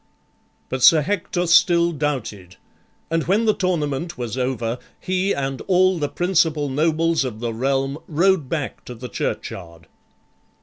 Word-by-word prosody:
But 130 0 -4
Sir 155 +3 +7
Hector 180 0 -1
still 170 0 +4
doubted, 130 - -4 0.6
and 165 -1 0
when 205 +6 +2
the 215 - +4
tournament 170 -4 -2
was 120 -2 -4
over, 125 -2 -2 0.2
he 185 +1 -1
and 135 -4 -2
all 185 -1 +3
the 145 -2 -1
principal 165 -5 +1
nobles 160 +2 +1
of 120 -5 -5
the 115 -1 -3
realm 135 +4 -1
rode 170 -2 +2
back 150 -5 -4
to 125 - -8
the 125 +2 -8
churchyard. 85 -5 -5
150 Hz, 140 wpm, -21 LUFS, 130-175 Hz, 0.6 s, Sir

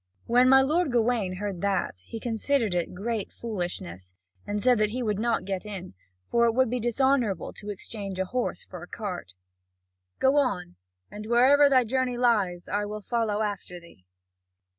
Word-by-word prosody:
When 250 +2 +4
my 265 0 +7
lord 310 +2 +1
Gawain 230 -5 +1
heard 195 -2 -4
that, 195 - -1
he 225 - -6
considered 230 -1 0
it 175 0 -2
great 215 +2 -3
foolishness, 95 - -6 0.3
and 205 0 -1
said 245 +1 +3
that 215 -1 +3
he 250 +3 -3
would 210 -3 -1
not 235 +1 0
get 190 -1 -3
in, 195 - -7 0.3
for 235 0 +3
it 230 - +2
would 260 -2 +3
be 250 - 0
dishonourable 240 -2 +1
to 210 - -8
exchange 200 -1 -6
a 190 - 0
horse 250 +6 -3
for 180 -2 -9
a 175 - -9
cart: 180 - -6 0.8
"Go 265 +2 +3
on, 190 -11 0 0.4
and 210 +1 -8
wherever 270 +5 +6
thy 260 -2 +5
journey 250 +1 -1
lies, 205 -8 +1
I 205 +1 -1
will 210 +1 -5
follow 220 -1 0
after 200 -4 -4
thee." 170 - -19
215 Hz, 175 wpm, -27 LUFS, 190-245 Hz, 0.8 s, my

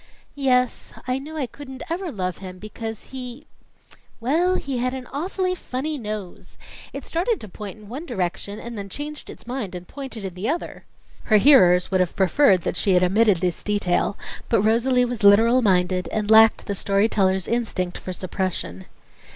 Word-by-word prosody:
"Yes. 255 -3 0
I 255 +1 0
knew 310 +3 -8
I 285 - 0
couldn't 265 +1 -9
ever 345 +1 -3
love 185 -5 -3
him, 185 -1 -8
because, 220 +2 -7
he 255 +2 -7 0.7
well, 330 +10 +2
he 275 -7 -3
had 255 +2 -1
an 260 -1 -6
awfully 365 +5 -1
funny 305 -2 -4
nose. 210 -5 -7 0.3
It - - -7
started 375 +7 0
to 215 - -8
point 205 +1 -8
in 210 -1 -14
one 275 +10 -7
direction, 200 - -3
and 235 +1 -7
then 200 -2 -6
changed 295 +7 -7
its - - -11
mind 240 -7 -4
and 180 0 -8
pointed 265 -7 -7
in 190 - -5
the 185 +5 -3
other." 330 +4 -4 0.4
Her 215 - +5
hearers 185 -9 +6
would 190 - +2
have 180 -2 0
preferred 190 - +4
that 180 - -3
she 195 - +2
had 180 - +4
omitted 205 +2 +4
this 180 -2 -1
detail; 205 -1 0 0.3
but 215 -4 +3
Rosalie 245 +3 +3
was 245 -2 -4
literal 225 +5 +6
minded 180 -3 +2
and 215 0 -1
lacked 220 0 +6
the 200 - -2
story 200 +2 +2
teller's 190 -4 +1
instinct 215 -7 -1
for 185 - -6
suppression. 180 - -3
220 Hz, 180 wpm, -23 LUFS, 190-265 Hz, 0.7 s, hearers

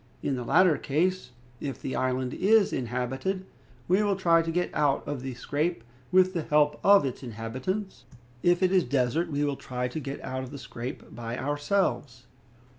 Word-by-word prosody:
In 140 - 0
the 125 - -4
latter 160 +3 +4
case, 175 +2 0 0.3
if 135 -4 -5
the 130 - -4
island 130 0 -1
is 210 +2 +3
inhabited, 130 - -2 0.4
we 185 +4 +3
will 205 -2 +2
try 170 -3 +4
to 165 - -4
get 175 +1 -1
out 145 -2 +1
of 145 -3 -3
the 130 -1 -5
scrape 150 +3 -2 0.3
with 185 0 +5
the 170 - -1
help 150 -1 +2
of 200 -5 +6
its 130 - -4
inhabitants; 130 - -4 0.4
if 175 +1 +3
it 185 - +3
is 185 -2 +4
desert, 140 +6 0
we 145 0 0
will 145 -1 0
try 125 -1 -3
to 125 +6 -5
get 140 -1 -5
out 130 0 -3
of 130 - -7
the 145 - -8
scrape 125 +1 -7
by 115 +1 -5
ourselves." 145 -3 -1
145 Hz, 185 wpm, -27 LUFS, 125-180 Hz, 0.4 s, of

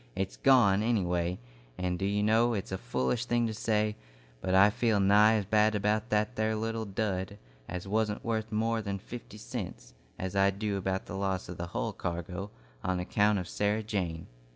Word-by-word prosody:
It's 95 0 -2
gone, 115 -8 +5
any 110 -3 +2
way, 90 0 0 0.4
and 90 -1 -2
do 95 - -1
you 100 +1 +1
know, 115 +2 +3
it's 100 -2 -4
a 95 - -2
foolish 110 - -1
thing 120 -1 +1
to 110 - -2
say, 105 0 0 0.5
but 95 0 0
I 100 +2 +7
feel 110 -2 +1
nigh 105 +3 +6
as 105 -3 0
bad 110 +2 +3
about 105 +2 0
that 105 +3 +1
there 110 0 0
little 115 +1 -2
dud 100 -1 -2 0.3
as 90 +1 -5
wasn't 105 +1 0
worth 110 -1 -1
more 115 +1 +1
'n 100 -1 -3
fifty 105 +1 -9
cents, 90 - -7 0.2
as 95 +1 -4
I 100 0 +5
do 100 +1 -2
about 95 0 -2
the - - -7
loss 95 -2 -2
of 90 - -6
the 85 - -4
hull 90 - -3
cargo, 90 +3 -4 0.3
on 90 -1 0
account 105 +3 +2
of 90 -3 -3
Sarah 105 +2 0
Jane." 90 -7 -3
105 Hz, 195 wpm, -30 LUFS, 95-110 Hz, 0.5 s, I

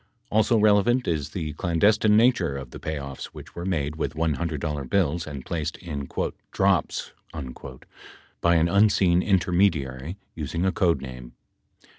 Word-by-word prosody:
Also 110 +2 +3
relevant 110 +4 +3
is 80 -5 -1
the 80 -5 -4
clandestine 105 +7 +3
nature 110 - +3
of 65 -2 -8
the - - -9
payoffs 70 -3 -5
which - - -12
were 85 +2 -5
made 75 -4 -1
with 80 - -3
$100 75 -3 -2
bills 85 -4 +1
and 70 -4 -7
placed 80 -2 -3
in 75 -6 -6 0.4
"drops" - - +1 1.3
by 85 0 +4
an 80 0 +4
unseen 95 -2 +4
intermediary 90 -6 +1 0.2
using 80 +3 -3
a 95 - +3
code 85 -6 +1
name. 65 -2 -9
85 Hz, 135 wpm, -25 LUFS, 75-95 Hz, 1.3 s, by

